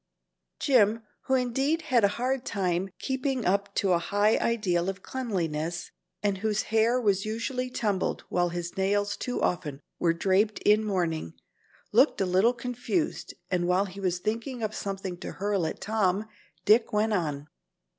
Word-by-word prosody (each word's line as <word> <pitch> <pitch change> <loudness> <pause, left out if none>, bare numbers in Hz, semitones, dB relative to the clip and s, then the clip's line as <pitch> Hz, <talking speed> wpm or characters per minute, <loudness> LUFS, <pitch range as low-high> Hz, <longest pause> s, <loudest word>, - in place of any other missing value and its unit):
Jim, 225 -5 +3 0.2
who 265 - +2
indeed 270 +6 +1
had 255 -7 +2
a - - +7
hard 255 +1 0
time 190 -4 -1
keeping 265 -2 -2
up 200 +2 0
to 195 -2 +2
a 170 - +3
high 205 +5 +2
ideal 190 -6 +1
of 195 0 -6
cleanliness, 175 -9 -3 0.3
and 200 -2 +1
whose 215 0 0
hair 230 +3 +4
was 200 -5 +2
usually 250 +4 -2
tumbled 210 -6 -1
while 175 0 +1
his 175 0 -5
nails 205 +1 +1
too 250 - -3
often 150 -5 -1 0.2
were 170 - +3
draped 195 +5 +2
in 210 +1 +5
mourning, 170 - -1 0.6
looked - - +4
a 195 - +2
little 190 +6 +3
confused, 250 +7 -3 0.2
and 175 -1 +1
while 185 +2 +3
he 195 0 -9
was 180 -2 0
thinking 230 +5 -3
up 215 0 -1
something 195 -3 -4
to - - -6
hurl 200 -1 -1
back 160 - -1
at - - -27
Tom, 205 -1 +1 0.4
Dick 225 +2 +5
went 215 +1 +1
on. 150 -7 -1
205 Hz, 165 wpm, -28 LUFS, 180-230 Hz, 0.6 s, a